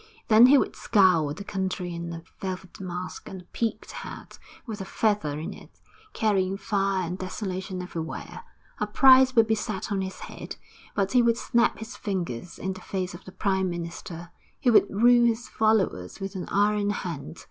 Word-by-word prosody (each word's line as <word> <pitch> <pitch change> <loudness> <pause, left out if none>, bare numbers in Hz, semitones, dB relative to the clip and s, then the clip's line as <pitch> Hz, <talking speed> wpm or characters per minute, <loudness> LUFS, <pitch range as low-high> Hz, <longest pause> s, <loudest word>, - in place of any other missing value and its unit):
Then 225 +3 +8
he 280 +2 +7
would - - 0
scour 180 -8 +3
the 165 +7 -6
country 185 -3 -3
in 170 0 -5
a 165 0 -7 0.2
velvet 185 -1 -6
mask 180 -1 -6
and 190 -1 -8
a - - -20
peaked 225 -2 -2
hat - - -9 0.3
with 215 -5 -6
a - - -2
feather 200 -7 0
in 155 - -5
it, - - -16 0.3
carrying 195 -3 +1
fire 195 -3 0
and 180 +2 -5
desolation 185 -1 -4
everywhere. 165 -3 -6 0.4
A - - 0
price 260 -1 +6
would 225 -1 +6
be 220 - +1
set 215 -1 -3
on 195 -1 0
his 190 0 -6
head, - - -8 0.4
but 195 -1 +1
he 250 - +5
would 235 -1 +3
snap 235 0 +2
his 220 +1 -8
fingers 180 - -4
in 190 +1 -3
the 185 - -11
face 185 -2 -3
of 175 - -11
the 185 - -10
Prime 190 -1 0
Minister. 170 0 -6 0.3
He 250 -4 +3
would 215 - +5
rule 240 +3 +5
his 235 +2 -1
followers 215 - +1
with 195 0 -5
an 185 -3 -5
iron 205 0 +2
hand. 170 -5 -5
190 Hz, 185 wpm, -26 LUFS, 180-220 Hz, 0.4 s, Then